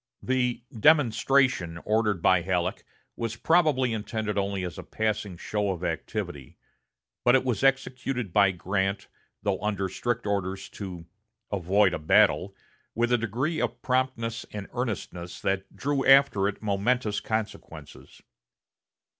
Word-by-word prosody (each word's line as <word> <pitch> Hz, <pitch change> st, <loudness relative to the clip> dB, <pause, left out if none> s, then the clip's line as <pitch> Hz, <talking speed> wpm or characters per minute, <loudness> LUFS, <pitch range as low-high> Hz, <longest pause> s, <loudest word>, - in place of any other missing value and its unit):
The 125 Hz, -2 st, 0 dB
"demonstration'" 125 Hz, -, +3 dB
ordered 105 Hz, -4 st, +1 dB
by 95 Hz, -2 st, +5 dB
Halleck 90 Hz, -1 st, -1 dB, 0.3 s
was 115 Hz, -1 st, -3 dB
probably 145 Hz, -4 st, +2 dB
intended 110 Hz, -1 st, -3 dB
only 100 Hz, -1 st, -1 dB
as 90 Hz, -, -6 dB
a -, -, -7 dB
passing 105 Hz, -4 st, -2 dB
show 105 Hz, +2 st, -2 dB
of 90 Hz, -2 st, -3 dB
activity; 75 Hz, -5 st, -4 dB, 0.7 s
but 120 Hz, -, +5 dB
it 130 Hz, -, +2 dB
was 125 Hz, -1 st, -1 dB
executed 130 Hz, -5 st, 0 dB
by 100 Hz, -2 st, +5 dB
Grant, 95 Hz, +2 st, -2 dB, 0.4 s
though 100 Hz, -2 st, -1 dB
under 100 Hz, -2 st, -1 dB
strict 115 Hz, +4 st, -2 dB
orders 95 Hz, -1 st, -2 dB
to 90 Hz, -4 st, -8 dB, 0.5 s
"avoid 100 Hz, 0 st, +2 dB
a -, -, -2 dB
battle," 95 Hz, +5 st, +3 dB, 0.4 s
with 120 Hz, +1 st, +1 dB
a -, -, +5 dB
degree 130 Hz, -, -1 dB
of 120 Hz, 0 st, -2 dB
promptness 125 Hz, -3 st, -1 dB
and 105 Hz, -2 st, -6 dB
earnestness 95 Hz, -7 st, -4 dB
that 95 Hz, 0 st, -2 dB
drew 140 Hz, -1 st, -1 dB
after 135 Hz, -7 st, +5 dB
it 105 Hz, +1 st, -5 dB
momentous 105 Hz, +2 st, 0 dB
consequences. 105 Hz, -10 st, -6 dB
105 Hz, 130 wpm, -27 LUFS, 95-125 Hz, 0.7 s, by